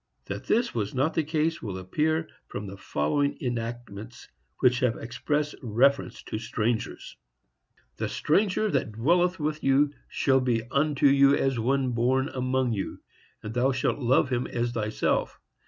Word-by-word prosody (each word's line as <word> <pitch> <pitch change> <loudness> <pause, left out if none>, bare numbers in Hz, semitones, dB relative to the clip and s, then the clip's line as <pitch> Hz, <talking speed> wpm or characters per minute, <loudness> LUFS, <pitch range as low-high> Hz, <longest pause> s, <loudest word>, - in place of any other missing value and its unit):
That - - -6
this 235 +2 +2
was 105 -1 -2
not 135 +5 +1
the 160 - +1
case 160 +1 -1
will 100 -4 -5
appear 155 - 0 0.2
from 105 - -6
the 100 0 -7
following 100 - -1
enactments, 120 -2 -5 0.3
which 125 0 +3
have 125 -3 +1
express 145 +5 -2
reference 130 +4 +1
to 110 - -4
strangers: 115 0 -3 0.8
The - - -2
stranger 200 +5 +1
that 130 -6 -1
dwelleth 175 +10 +2
with 150 0 -2
you 140 +2 +3 0.2
shall 135 -1 +2
be 120 -3 0
unto 145 0 +1
you 140 0 +6
as 135 -4 0
one 130 +2 +1
born 130 +3 +1
among 130 -1 0
you, 95 -3 -4 0.4
and 105 - -5
thou 130 +3 +2
shalt 130 - 0
love 130 +1 +3
him 125 0 0
as 120 0 -2
thyself. 110 -2 -1
130 Hz, 155 wpm, -27 LUFS, 115-145 Hz, 0.8 s, you